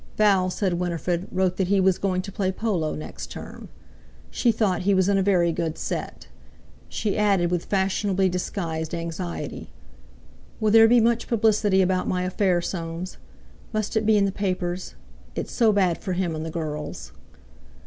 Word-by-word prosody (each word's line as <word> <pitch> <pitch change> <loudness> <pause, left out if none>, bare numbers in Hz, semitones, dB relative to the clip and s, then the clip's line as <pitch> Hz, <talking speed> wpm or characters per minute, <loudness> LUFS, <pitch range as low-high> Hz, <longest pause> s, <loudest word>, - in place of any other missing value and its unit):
Val, 195 -3 +4
said 185 0 -1
Winifred, 175 +1 -2
wrote 185 -1 0
that 190 - +1
he 200 +1 +3
was 190 -1 +3
going 185 -2 0
to 200 - -7
play 190 -1 -1
polo 190 -7 -1
next 155 - -7
term. - - -9 0.6
She 240 - +2
thought 205 -5 0
he 195 +2 +2
was 190 0 +3
in 200 -1 +3
a - - +2
very 180 -3 +3
good 165 -1 -2
set. - - -5 0.6
She 210 -3 -2
added 195 -4 +2
with 175 -2 -1
fashionably 195 0 +1
disguised 170 -3 -3
anxiety: 170 +1 -5 0.9
"Will 215 -2 +2
there 225 +1 +8
be 240 +1 +5
much 235 +1 +2
publicity 210 -4 +3
about 185 0 0
my 180 0 0
affair, 185 -1 +1
Soames? 170 0 -5 0.6
Must 215 +1 -2
it 220 -1 +1
be 220 -1 +5
in 200 - +3
the 195 - 0
papers? 185 -2 -3 0.4
It's - - -4
so 230 -3 +3
bad 185 -5 +2
for 185 - -2
him, 175 -2 -1
and 155 - -4
the 165 - -4
girls." 155 -2 -5
185 Hz, 170 wpm, -24 LUFS, 175-205 Hz, 0.9 s, there